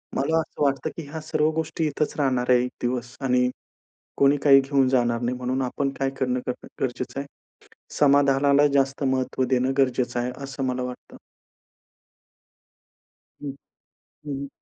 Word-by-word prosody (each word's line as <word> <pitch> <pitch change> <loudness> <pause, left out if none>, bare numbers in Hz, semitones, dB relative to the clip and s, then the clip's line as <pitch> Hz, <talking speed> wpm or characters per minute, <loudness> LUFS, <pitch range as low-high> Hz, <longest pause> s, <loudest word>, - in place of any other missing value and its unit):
मला 160 +4 +1
असं 160 - -6
वाटतं, 135 -2 +1
की 165 - -4
ह्या 160 - -5
सर्व 155 0 +1
गोष्टी 160 0 -2
इथचं 150 +1 -2
राहणार 130 -3 0
आहे 125 -1 +6
1 125 - -4
दिवस 120 +1 -3
आणि 125 0 +3 0.7
कोणी 140 +1 +4
काही 135 -2 +8
घेऊन 135 -1 +2
जाणार 120 -2 +2
नाही. 125 +1 -1
म्हणून 125 +1 -2
आपण 135 +2 -1
काय 135 0 +1
करणं 125 -1 0
ग 125 - +2 0.3
गरजेचं 125 +1 -3
आहे? 140 - -4 0.7
समाधानाला 140 0 +4
जास्त 135 0 +1
महत्व 130 0 0
देणं 130 0 +2
गरजेचं 125 -2 +1
आहे 125 +1 -2
असं 135 0 -5
मला 125 -1 -1
वाटतं. 125 0 -8 2.2
हं, 145 -2 -4 0.7
हं, 145 - -5
हं. 140 +1 -4
135 Hz, 150 wpm, -24 LUFS, 125-140 Hz, 2.2 s, काही